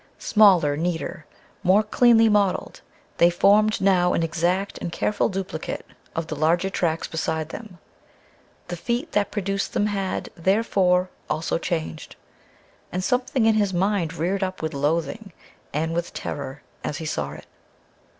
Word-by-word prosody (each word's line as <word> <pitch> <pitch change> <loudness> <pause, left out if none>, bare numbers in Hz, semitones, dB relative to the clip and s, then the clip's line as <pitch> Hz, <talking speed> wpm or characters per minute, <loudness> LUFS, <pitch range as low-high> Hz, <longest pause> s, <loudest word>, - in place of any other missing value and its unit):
Smaller, 185 -9 +4
neater, 170 +1 -3 0.3
more 195 +4 +4
cleanly 225 +1 +5
modeled, 205 -3 +1 0.4
they 170 - +6
formed 210 +4 +4
now 180 -2 +3
an 165 - +1
exact 175 +4 -1
and 170 - -4
careful 210 +4 0
duplicate 190 -4 -4 0.3
of 165 - -1
the 155 - -5
larger 170 +5 +1
tracks 165 -3 -1
beside 160 -1 -2
them. 215 -5 -9 0.9
The 175 - -4
feet 240 - -2
that 205 -1 +1
produced 200 -1 -2
them 205 - +1
had, 195 -2 -2
therefore, 185 -1 +2 0.2
also 155 +2 -1
changed. 160 -3 -4 0.8
And 180 +1 -2
something 250 +1 +1
in 225 - +5
his 205 -3 +1
mind 180 -3 0
reared 180 +5 -1
up 185 -3 -3
with 160 0 -2
loathing 165 +8 -1 0.4
and 160 +3 -1
with 170 +1 -3
terror 140 0 -5 0.2
as 145 - -3
he 160 - -6
saw 75 - -3
it. 75 - -11
180 Hz, 145 wpm, -24 LUFS, 160-205 Hz, 0.9 s, they